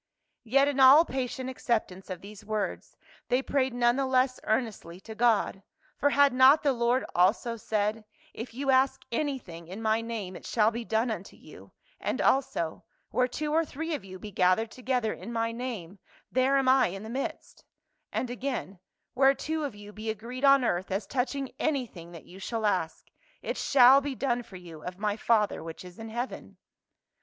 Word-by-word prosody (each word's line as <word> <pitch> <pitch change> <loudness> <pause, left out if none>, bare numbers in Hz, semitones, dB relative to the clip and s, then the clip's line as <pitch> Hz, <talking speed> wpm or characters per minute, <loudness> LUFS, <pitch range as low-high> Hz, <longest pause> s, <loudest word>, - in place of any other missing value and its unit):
Yet 275 +5 +4
in 285 -1 -1
all 270 +5 +8
patient 260 -1 -3
acceptance 220 -7 -2
of 185 -2 -6
these 210 +1 -11
words 210 -1 -4 0.3
they 255 +2 +1
prayed 265 -2 0
none 240 +1 +3
the 270 -1 0
less 255 0 +2
earnestly 215 -7 -2
to 220 - -9
God; 220 -4 +2 0.3
for 285 - +2
had 285 -1 +4
not 260 +5 +6
the 280 -2 +3
Lord 240 +1 +1
also 205 +6 +2
said, 215 0 -1 0.2
" - - -30
If 240 - -12
ye 270 +4 -5
ask 265 +1 +3
anything 235 - -3
in 190 +5 -7
my 220 0 +1
name 220 -5 -5
it - - -10
shall 220 -1 +2
be 235 +1 -4
done 225 +1 0
unto 195 -3 -6
you," - - -15 0.3
and - - -2
also, 255 -12 0 0.3
"Where 250 0 +2
two 300 +4 -3
or 325 +1 +3
three 320 +2 -5
of 290 - -4
you 185 -1 -9
be 210 +3 -9
gathered 190 +5 +2
together 250 -3 -1
in 235 - -8
my 230 0 -1
name 225 -7 -6 0.3
there 260 +2 +3
am 270 -1 +1
I 260 +1 +5
in 195 +3 -7
the - - -7
midst," 260 +4 -5 0.5
and 250 - -2
again, 245 -7 -4 0.3
"Where 270 +1 +4
two 315 +3 -3
of 275 - -5
you 205 0 -12
be 215 +1 -5
agreed 235 +5 -6
on 275 -2 +6
earth 180 -3 -1
as 195 +2 -2
touching 270 +1 -2
anything 240 - -2
that 165 - -11
you 185 - -13
shall 225 +2 -3
ask, 180 -6 -1 0.4
it - - -2
shall 270 0 +6
be 280 -1 -4
done 245 -2 0
for 205 - -14
you 170 -4 -10
of 180 +2 -7
my 210 0 -1
Father 215 -1 +1
which 165 +2 -8
is 180 +2 -12
in 225 0 -7
heaven." 240 +3 -5
235 Hz, 190 wpm, -28 LUFS, 205-265 Hz, 0.5 s, all